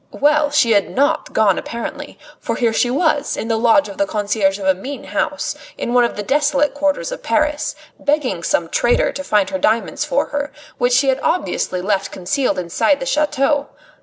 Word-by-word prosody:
Well! 295 +1 +3
she 290 -5 +3
had 205 -2 +3
not 280 +2 0
gone 210 -4 +3
apparently, 235 0 -6 0.2
for - - -3
here 230 -2 +1
she 245 - +2
was, 295 +1 0
in 225 - -4
the 225 - +2
lodge 235 +6 +3
of 290 - -10
the 295 - +2
concierge 205 -2 0
of 195 - -6
a 190 - +4
mean 265 +10 -7
house - - -2 0.2
in 240 - -3
one 245 -1 +5
of 235 - -3
the 205 - -4
desolate 290 +3 +1
quarters 290 +9 -1
of - - -6
Paris, 305 0 0 0.2
begging 285 - 0
some 170 0 0
traitor 240 - +2
to 280 - -6
find 210 -7 +1
her 190 - -2
diamonds 220 +4 0
for - - 0
her, 290 0 -3 0.3
which 245 0 +2
she 270 +2 +4
had 265 0 +1
obviously 255 - -1
left 195 -1 -1
concealed 255 +9 -1
inside 180 - +1
the 265 - -4
chateau. 290 0 +1
265 Hz, 195 wpm, -19 LUFS, 215-290 Hz, 0.3 s, one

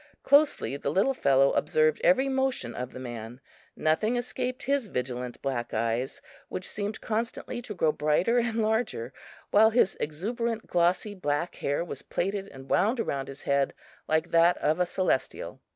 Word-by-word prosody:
Closely 285 - +3
the 140 - -2
little 195 - +2
fellow 135 - +4
observed 155 0 +2
every 270 0 +4
motion 265 - 0
of 125 0 -5
the - - -10
man; 120 -1 -7 0.4
nothing 215 +10 +1
escaped 250 +1 -3
his 275 -3 0
vigilant 125 -5 -4
black 120 -4 -2
eyes, 115 +3 -1 0.3
which 185 - -5
seemed 205 +1 -4
constantly 230 +2 -3
to 225 -4 -7
grow 160 -3 +3
brighter 155 +12 +2
and 230 -1 0
larger, 215 - -1 0.4
while 220 +2 +7
his 225 -4 +3
exuberant 225 +9 -2
glossy 180 +4 +1
black 150 -2 -1
hair 145 +4 -1
was - - -6
plaited 195 +1 -2
and 135 -5 -12
wound 225 +6 +3
around 140 -11 -2
his 135 0 -9
head 140 -1 +1 0.3
like 155 0 +1
that 170 +1 +5
of 155 +3 +1
a 180 - +2
Celestial. 185 -7 -1
175 Hz, 160 wpm, -28 LUFS, 140-225 Hz, 0.4 s, while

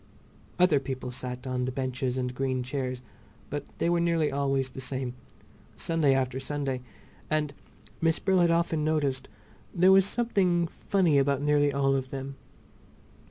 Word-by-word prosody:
Other 175 -5 +5
people 130 -2 -5
sat 125 0 -5
on 125 -1 -1
the 130 - -2
benches 130 -1 -2
and 125 -1 -2
green 130 0 -1
chairs, 130 -1 -3 0.5
but 145 0 -3
they - - 0
were 170 0 +2
nearly 170 -2 +1
always 135 -1 0
the 130 - -7
same, 130 -1 -3 0.6
Sunday 155 -5 +2
after 130 -1 0
Sunday, 135 -2 -3 0.5
and—Miss 155 +2 -2
Brill 190 -1 +2
had 170 -1 +4
often 165 -2 +1
noticed—there 155 +4 0
was 195 0 +6
something 190 -7 +1
funny 170 -3 +1
about 140 0 +1
nearly 145 -1 +3
all 135 0 +2
of 130 -1 -2
them. 135 0 -6
140 Hz, 145 wpm, -28 LUFS, 130-165 Hz, 0.6 s, was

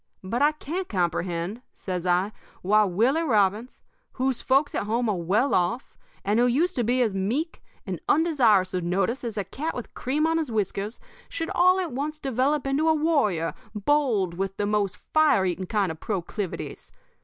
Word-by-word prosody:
But 230 +7 -2
I 295 +1 +4
can't 345 +5 -5
comprehend,' 175 +2 -1
says 180 -2 -4
I, 180 +3 +2 0.3
'why 210 +3 +4
Willie 230 - +2
Robbins, 220 - +1 0.3
whose 260 -1 -1
folks 275 +2 +2
at - - -1
home 235 +2 0
are 210 - +1
well 195 +10 +1
off, 225 +9 0 0.3
and 210 +3 +2
who 245 - +4
used 325 +10 +1
to 245 - +2
be 250 +3 +2
as 220 -4 0
meek 235 - -2 0.2
and - - -4
undesirous 240 - +3
of 180 -1 -1
notice 195 +9 0
as 225 -3 -4
a 200 - 0
cat 295 - -4
with 245 - -7
cream 290 +5 0
on 325 0 +2
his 305 -6 -3
whiskers, 210 0 -2 0.3
should 330 +2 -4
all 365 0 +4
at 355 -5 -2
once 295 +4 -3
develop 270 +2 0
into 285 +4 +1
a 320 - +4
warrior 280 - +1 0.2
bold 215 -6 +1
with 195 +2 -3
the 205 - 0
most 205 -2 0
fire 310 -11 +3
eating 180 0 -2
kind 205 -5 0
of 160 - -9
proclivities. 195 -1 -4
230 Hz, 180 wpm, -25 LUFS, 195-290 Hz, 0.3 s, I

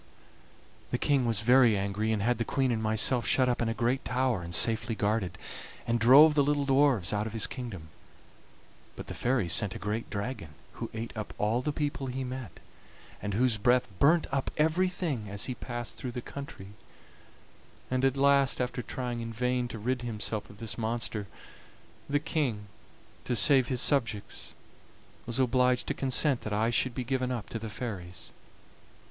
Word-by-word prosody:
The - - -1
King 135 -4 +1
was 110 -3 +1
very 120 -2 +5
angry, 100 +3 -1
and 105 -2 0
had 120 0 +1
the - - +1
Queen 135 +1 0
and 110 -2 -1
myself 110 +2 +1
shut 130 -1 +3
up 120 -1 0
in 115 - +1
a - - 0
great 120 +4 0
tower 125 -5 0
and 85 +1 -2
safely 115 0 +3
guarded, 105 -5 -1 0.5
and 120 0 0
drove 140 +7 +8
the 150 - +3
little 145 0 +1
dwarfs 135 -9 +3
out 105 +1 -1
of 110 - -7
his 115 - +1
kingdom; 105 - -7 1.1
but - - -8
the - - -6
fairies 120 -10 +1
sent 95 +2 +4
a - - -4
great 105 +3 -3
dragon 100 - -5 0.2
who - - -6
ate 115 +2 -5
up 110 -1 -6
all 110 +4 +1
the 150 - -1
people 145 -2 -3
he 130 +1 -3
met, 130 -1 -7 0.6
and 100 -1 -3
whose 120 -1 +2
breath 125 +3 +3
burnt 160 +4 +4
up 135 -1 -1
everything 160 - 0
as 100 0 -3
he 130 - -3
passed 120 -1 -6
through 125 -2 -5
the 125 - -4
country; 125 -7 -9 1.2
and 130 0 0
at 135 0 +2
last, 140 -1 +3
after 125 0 -2
trying 125 -1 -4
in 115 0 -5
vain 125 +2 -1
to 120 - -7
rid 125 +4 -2
himself 110 -2 -4
of 105 - -14
this 115 +1 -5
monster, 110 -2 -3 0.8
the 145 - +2
King, 135 -9 -2 0.6
to 125 - -1
save 130 +1 +5
his 125 -2 -1
subjects, 115 -8 -1 0.7
was 120 - -2
obliged 125 -1 +2
to - - -1
consent 135 0 +2
that 105 - -4
I 110 +3 +1
should 120 +1 +1
be 130 - -2
given 130 0 -1
up 120 -4 -4
to 115 - -4
the 110 0 -6
fairies. 100 -6 -7
120 Hz, 180 wpm, -29 LUFS, 110-130 Hz, 1.2 s, drove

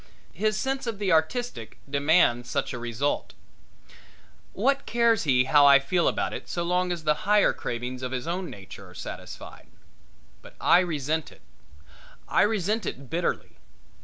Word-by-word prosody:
His 215 +4 0
sense 265 +2 -2
of 225 -3 -3
the 200 -2 -1
artistic 160 - -1
demands 140 -4 +2
such 140 -3 -2
a 120 - -5
result. 120 +4 -2 1.2
What 275 +7 0
cares 235 -3 +2
he 125 -3 +4
how 145 +1 +5
I 140 0 +9
feel 170 +5 0
about - - -1
it - - -7
so 175 - -2
long 180 +1 0
as 170 -2 -4
the 150 - +3 0.2
higher 210 -1 +5
cravings 125 +1 -5
of 130 -1 -4
his 130 -1 -3
own 180 +2 -3
nature 95 -2 -11
are - - -16
satisfied? - - -9 0.7
But - - -15
I 175 - +5
resent 160 -3 -2
it - - -18 0.9
I - - +2
resent 210 +1 0
it 135 -1 -7
bitterly. 170 +1 -2
165 Hz, 160 wpm, -26 LUFS, 135-205 Hz, 1.2 s, I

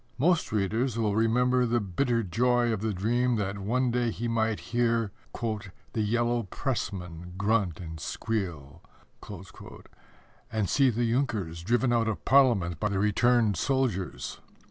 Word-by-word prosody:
Most 165 +5 +2
readers 110 +4 0
will 105 -3 +1
remember 125 +3 +3
the 120 +1 +2
bitter 115 +4 0
joy 120 +4 +2
of 105 - -3
the 110 0 0
dream 120 +6 +1
that 100 -2 -2
one 120 +5 0
day 120 0 +1
he 120 +2 -3
might 110 -2 0
hear 115 -3 +1 0.8
"the 110 - 0
yellow 120 +2 +1
pressmen 90 - -4
grunt 100 -4 +1
and 80 -2 -7
squeal," 85 -7 -4 1.7
and 110 -3 0
see 135 +4 +4
the 120 0 0
Junkers 105 -11 -1
driven 120 +6 +1
out 115 -1 +2
of 110 - -3
Parliament 115 - +4
by 105 - 0
the 100 - -1
returned 105 0 +3
soldiers. 125 - -1
115 Hz, 140 wpm, -28 LUFS, 100-120 Hz, 1.7 s, see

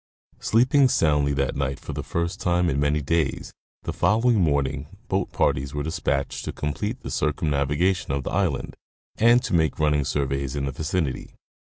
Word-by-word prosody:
Sleeping 130 +4 +4
soundly 75 -7 +2
that 70 -1 -1
night, 70 -1 -2
for - - -7
the - - -3
first 85 +3 -3
time 90 -1 +2
in 70 - 0
many 75 +1 +1
days, 80 0 -1 0.3
the - - -3
following 115 +1 +3
morning 70 -2 0 0.2
boat 95 0 0
parties 70 +2 0
were 75 - -2
dispatched 75 -4 -2
to - - -3
complete 105 - -3
the - - -6
circumnavigation 75 +3 0
of 70 -1 -1
the - - -4
island 90 -7 -1 0.4
and 120 +2 +5
to - - -3
make 80 -2 +2
running 75 -2 +2
surveys 70 0 -2
in 70 -1 -1
the 70 - -2
vicinity. 80 0 -3
75 Hz, 170 wpm, -24 LUFS, 70-90 Hz, 0.4 s, and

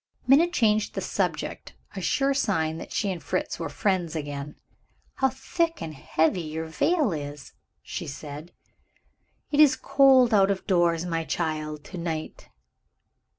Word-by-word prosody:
Minna 285 +6 +6
changed 215 -10 +1
the - - -1
subject - - -3 0.2
a - - -4
sure 275 0 +1
sign 165 -11 0
that - - -9
she 200 -3 0
and 180 - -5
Fritz - - -2
were - - -3
friends 180 -5 -1
again. 145 -1 -5 0.6
"How 265 - +3
thick 330 +5 -2
and 160 - -5
heavy 160 +5 0
your 160 0 -4
veil 280 - +1
is!" 145 -1 -7 0.3
she - - -6
said. 150 +3 -8 1.0
"It 290 - +1
is 300 -3 +7
cold 265 -4 +5
out 195 -2 +5
of 195 -1 -2
doors, 175 -3 +2
my 165 -2 -1
child, 155 -2 -3
to 180 - -8
night." 160 -2 -5
175 Hz, 150 wpm, -26 LUFS, 155-255 Hz, 1.0 s, is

